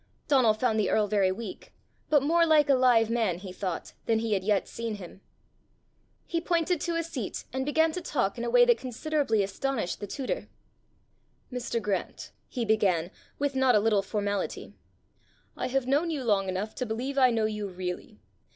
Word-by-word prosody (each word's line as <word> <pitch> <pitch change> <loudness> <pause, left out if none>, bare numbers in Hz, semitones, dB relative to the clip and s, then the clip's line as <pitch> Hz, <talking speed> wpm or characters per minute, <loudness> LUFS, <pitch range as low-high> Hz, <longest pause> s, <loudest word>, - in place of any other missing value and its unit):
Donal 255 -7 +4
found 220 -1 +1
the 210 - +1
earl 215 - +3
very 200 -2 +2
weak, 210 0 -7 0.4
but 295 -3 +4
more 335 +4 +4
like 310 -3 +4
a - - +7
live 245 -3 +4
man, 220 -7 +1
he 185 0 -8
thought, 185 -3 -4
than 225 - +3
he 220 -1 -1
had 190 -2 0
yet 205 -1 +1
seen 230 -2 -4
him. 190 -1 -11 1.0
He 335 -2 -2
pointed 340 -1 0
to 340 - -1
a 335 - 0
seat, 305 -10 -5
and 265 +1 -2
began 320 +2 +3
to 360 - -4
talk 245 - -1
in 235 - -5
a 240 - -1
way 245 0 +6
that 240 -1 +4
considerably 255 -3 0
astonished 225 0 -2
the 205 - -5
tutor. 270 - -4 1.1
"Mr. 245 -1 -2
Grant," 210 -3 -3 0.2
he 245 -4 -2
began, 190 -6 +2 0.3
with 285 0 -1
not 260 -2 +4
a - - +6
little 210 -1 +2
formality, 205 0 -3 0.8
"I - - -2
have 265 0 0
known 290 +6 +1
you 295 -5 -2
long 200 -4 +1
enough 190 +4 -3
to 250 - -1
believe 255 +6 -2
I 255 -1 +6
know 225 -2 +1
you 210 -1 -2
really. 185 +3 -6
230 Hz, 190 wpm, -28 LUFS, 205-275 Hz, 1.1 s, a